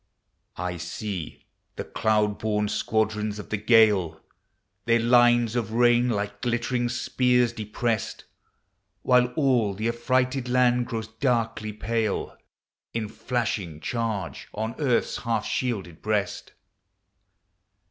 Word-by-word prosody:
I 90 Hz, -1 st, -3 dB
see 90 Hz, 0 st, -6 dB, 0.3 s
the -, -, -4 dB
cloud 105 Hz, -1 st, 0 dB
born 105 Hz, -1 st, 0 dB
squadrons 105 Hz, -1 st, -1 dB
<>r 105 Hz, -, -7 dB
the 110 Hz, -, -2 dB
gale. 105 Hz, -7 st, +4 dB, 0.7 s
Their 115 Hz, 0 st, +3 dB
lines 120 Hz, -1 st, +4 dB
of 110 Hz, -3 st, -2 dB
rain 120 Hz, +1 st, +4 dB
like 105 Hz, -2 st, -3 dB
glittering 120 Hz, 0 st, 0 dB
spears 125 Hz, 0 st, +1 dB
deprest, 110 Hz, 0 st, -2 dB, 0.8 s
While 125 Hz, -1 st, +4 dB
all 125 Hz, -9 st, +2 dB
Hie 110 Hz, +2 st, 0 dB
affrighted 125 Hz, +2 st, 0 dB
land 125 Hz, -1 st, +3 dB
grows 115 Hz, -3 st, -4 dB
da.kl.v 115 Hz, -2 st, -1 dB
pal< 110 Hz, 0 st, -2 dB, 0.6 s
In 110 Hz, -2 st, -2 dB
flashing 110 Hz, -9 st, -3 dB
charge 115 Hz, +1 st, -3 dB
on 110 Hz, +2 st, -2 dB
earth's 130 Hz, -6 st, +1 dB
half 115 Hz, -3 st, -1 dB
shielded 100 Hz, -10 st, -3 dB
breast. 105 Hz, -2 st, -2 dB
115 Hz, 110 wpm, -25 LUFS, 105-120 Hz, 0.8 s, gale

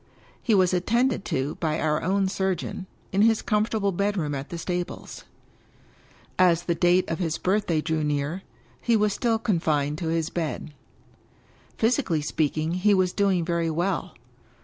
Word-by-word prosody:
He 225 Hz, -, +2 dB
was 185 Hz, -2 st, +3 dB
attended 230 Hz, +6 st, +1 dB
to 135 Hz, +2 st, -2 dB
by 160 Hz, -1 st, 0 dB
our 150 Hz, -1 st, +1 dB
own 195 Hz, +2 st, +1 dB
surgeon, 190 Hz, 0 st, -2 dB, 0.2 s
in 195 Hz, -, +2 dB
his 225 Hz, 0 st, +4 dB
comfort 215 Hz, +1 st, 0 dB
able 200 Hz, -2 st, +1 dB
bedroom 190 Hz, -5 st, -1 dB
at 135 Hz, 0 st, -5 dB
the 170 Hz, -, -5 dB
stables. 175 Hz, +1 st, -5 dB, 1.1 s
As 175 Hz, -2 st, +4 dB
the 175 Hz, -, 0 dB
date 175 Hz, +2 st, +3 dB
of 165 Hz, -, -3 dB
his 165 Hz, -3 st, -1 dB
birthday 185 Hz, -4 st, +1 dB
drew 160 Hz, -1 st, -1 dB
near, 150 Hz, +4 st, -1 dB, 0.4 s
he 235 Hz, -, +2 dB
was 210 Hz, -1 st, +2 dB
still 230 Hz, -2 st, +1 dB
confined 155 Hz, -8 st, 0 dB
to 170 Hz, -, -3 dB
his 165 Hz, 0 st, -1 dB
bed. 160 Hz, -2 st, -4 dB, 1.0 s
Physically 225 Hz, -, +1 dB
speaking, 155 Hz, +1 st, -1 dB
he 200 Hz, +3 st, +3 dB
was 185 Hz, -1 st, +1 dB
doing 195 Hz, -4 st, +1 dB
very 170 Hz, -1 st, 0 dB
well. 175 Hz, +5 st, -2 dB
175 Hz, 155 wpm, -25 LUFS, 160-200 Hz, 1.1 s, his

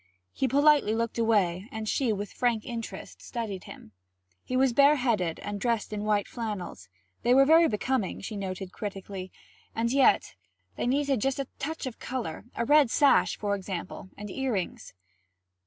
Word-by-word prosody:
He 265 Hz, -, 0 dB
politely 285 Hz, -4 st, +4 dB
looked 230 Hz, 0 st, -2 dB
away, 205 Hz, -3 st, +1 dB
and 220 Hz, -1 st, -5 dB
she 250 Hz, +1 st, +1 dB
with 205 Hz, -1 st, -4 dB
frank 235 Hz, -4 st, 0 dB
interest 235 Hz, -3 st, -7 dB
studied 215 Hz, -6 st, -5 dB
him. -, -, -12 dB, 0.5 s
He 255 Hz, -, -2 dB
was 260 Hz, -2 st, +3 dB
bareheaded 245 Hz, -, +3 dB
and 205 Hz, -1 st, -5 dB
dressed 230 Hz, -3 st, -1 dB
in 210 Hz, 0 st, -3 dB
white 210 Hz, -1 st, +1 dB
flannels; 200 Hz, -, -6 dB, 0.3 s
they 245 Hz, +1 st, +4 dB
were 275 Hz, +1 st, +7 dB
very 325 Hz, +3 st, +6 dB
becoming, 225 Hz, -2 st, -1 dB
she 215 Hz, +2 st, -6 dB
noted 190 Hz, -1 st, -5 dB
critically, 195 Hz, -2 st, -6 dB, 0.4 s
and 230 Hz, +1 st, 0 dB
yet 270 Hz, 0 st, +3 dB, 0.4 s
they -, -, -2 dB
needed 275 Hz, -2 st, +1 dB
just 270 Hz, +2 st, 0 dB
a 275 Hz, -, -2 dB
touch 315 Hz, +2 st, -4 dB
of 255 Hz, -3 st, -6 dB
colour; 230 Hz, -10 st, -5 dB
a 235 Hz, -, -1 dB
red 290 Hz, -2 st, +5 dB
sash, 285 Hz, +4 st, +4 dB
for 205 Hz, -1 st, -1 dB
example, 185 Hz, -2 st, -5 dB
and 205 Hz, -1 st, -7 dB
earrings. 235 Hz, -, -3 dB
225 Hz, 160 wpm, -28 LUFS, 200-265 Hz, 0.5 s, were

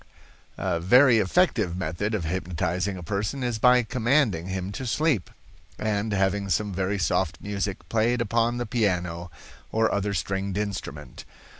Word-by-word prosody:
"A 85 Hz, -, -1 dB
very 120 Hz, +7 st, +6 dB
effective 105 Hz, -, +2 dB
method 95 Hz, +5 st, -2 dB
of 95 Hz, -, -2 dB
hypnotizing 90 Hz, +2 st, -2 dB
a 90 Hz, -, -8 dB
person 105 Hz, +9 st, -2 dB
is 120 Hz, -3 st, -1 dB
by 125 Hz, +1 st, +5 dB
commanding 115 Hz, -, +1 dB
him 95 Hz, 0 st, -3 dB
to 130 Hz, +5 st, -5 dB
sleep, 145 Hz, -, +1 dB, 0.5 s
and 110 Hz, 0 st, -1 dB
having 100 Hz, 0 st, 0 dB
some 100 Hz, +4 st, 0 dB
very 95 Hz, +2 st, -1 dB
soft 85 Hz, -2 st, 0 dB
music 100 Hz, -1 st, -4 dB
played 115 Hz, +2 st, +1 dB
upon 115 Hz, +1 st, +1 dB
the 120 Hz, -, -2 dB
piano, 90 Hz, -6 st, -1 dB, 0.4 s
or 110 Hz, 0 st, +2 dB
other 100 Hz, 0 st, -1 dB
stringed 95 Hz, +2 st, -2 dB
instrument. 85 Hz, -10 st, -5 dB
100 Hz, 145 wpm, -26 LUFS, 90-115 Hz, 0.5 s, very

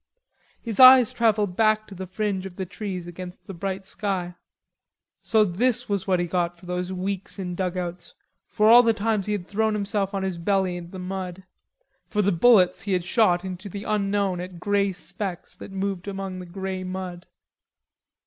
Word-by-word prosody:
His 225 Hz, -4 st, -4 dB
eyes 255 Hz, -2 st, +9 dB
travelled 210 Hz, -5 st, +1 dB
back 215 Hz, 0 st, +3 dB
to 200 Hz, -, -12 dB
the 190 Hz, 0 st, -7 dB
fringe 195 Hz, 0 st, -2 dB
of 180 Hz, -, -13 dB
the 190 Hz, -, -4 dB
trees 185 Hz, -1 st, -5 dB
against 180 Hz, +1 st, -9 dB
the 195 Hz, -, -8 dB
bright 190 Hz, +2 st, -4 dB
sky. 190 Hz, -3 st, -3 dB, 0.9 s
So 220 Hz, -1 st, +3 dB
this 215 Hz, +6 st, 0 dB
was 200 Hz, -2 st, -2 dB
what 185 Hz, -2 st, +2 dB
he 175 Hz, -, +1 dB
got 175 Hz, 0 st, -1 dB
for 175 Hz, -, -16 dB
those 180 Hz, +1 st, -3 dB
weeks 190 Hz, +2 st, -4 dB
in 180 Hz, -2 st, -4 dB
dugouts, 180 Hz, -1 st, -4 dB, 0.3 s
for 215 Hz, -1 st, +2 dB
all 235 Hz, +2 st, +9 dB
the 230 Hz, -2 st, +3 dB
times 215 Hz, -1 st, 0 dB
he 210 Hz, -, 0 dB
had 195 Hz, -4 st, -3 dB
thrown 220 Hz, +2 st, 0 dB
himself 200 Hz, -1 st, -1 dB
on 195 Hz, -, -1 dB
his 185 Hz, -3 st, -3 dB
belly 190 Hz, 0 st, +1 dB
in 175 Hz, -1 st, -7 dB
the 190 Hz, -, -9 dB
mud, 185 Hz, 0 st, -5 dB, 0.6 s
for 210 Hz, -1 st, 0 dB
the 200 Hz, -, +3 dB
bullets 185 Hz, -1 st, +5 dB
he 200 Hz, -3 st, -2 dB
had 180 Hz, -1 st, +1 dB
shot 180 Hz, -3 st, +2 dB
into 185 Hz, +2 st, -6 dB
the 200 Hz, +2 st, -6 dB
unknown 200 Hz, -3 st, 0 dB
at 180 Hz, -1 st, -8 dB
grey 200 Hz, +1 st, +1 dB
specks 185 Hz, -1 st, -6 dB
that -, -, -10 dB
moved 195 Hz, -1 st, -3 dB
among 195 Hz, -2 st, -5 dB
the 180 Hz, -, -8 dB
grey 190 Hz, +1 st, -4 dB
mud. 185 Hz, -1 st, -6 dB
190 Hz, 185 wpm, -25 LUFS, 180-205 Hz, 0.9 s, eyes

